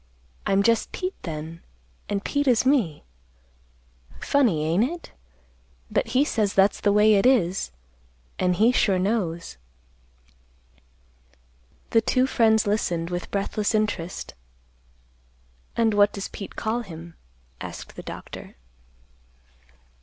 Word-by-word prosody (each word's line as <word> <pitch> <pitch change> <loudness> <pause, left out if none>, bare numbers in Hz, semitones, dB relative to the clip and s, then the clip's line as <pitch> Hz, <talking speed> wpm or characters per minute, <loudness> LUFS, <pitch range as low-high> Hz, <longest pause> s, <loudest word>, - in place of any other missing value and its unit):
I'm 195 0 +3
just 230 +1 +2
Pete 370 0 -3
then, 160 0 -6 0.5
an' 200 -1 -1
Pete 285 +6 -1
is 245 -2 +4
me. 235 - +2 1.2
Funny, 220 - +2
ain't 170 +7 +2
it? 335 +7 -4 0.8
But - - +1
he 280 - +5
says 215 -7 0
that's 195 +1 +4
the 205 - +3
way 210 +1 +5
it 205 +4 +4
is, 195 -8 +2 0.7
an' 180 0 +2
he 220 +7 +4
sure 200 -6 +2
knows." 180 - -2 2.3
The 225 - +5
two 255 +3 +2
friends 225 -4 +3
listened 180 -5 -1
with 175 0 -4
breathless 205 +2 -1
interest. 205 -5 -2 1.4
"And 225 -2 +3
what 205 0 +4
does 200 - -5
Pete 195 - -8
call 225 +2 -1
him?" 170 -5 -10 0.5
asked - - -8
the - - -7
doctor. - - -9
205 Hz, 115 wpm, -25 LUFS, 180-230 Hz, 2.3 s, he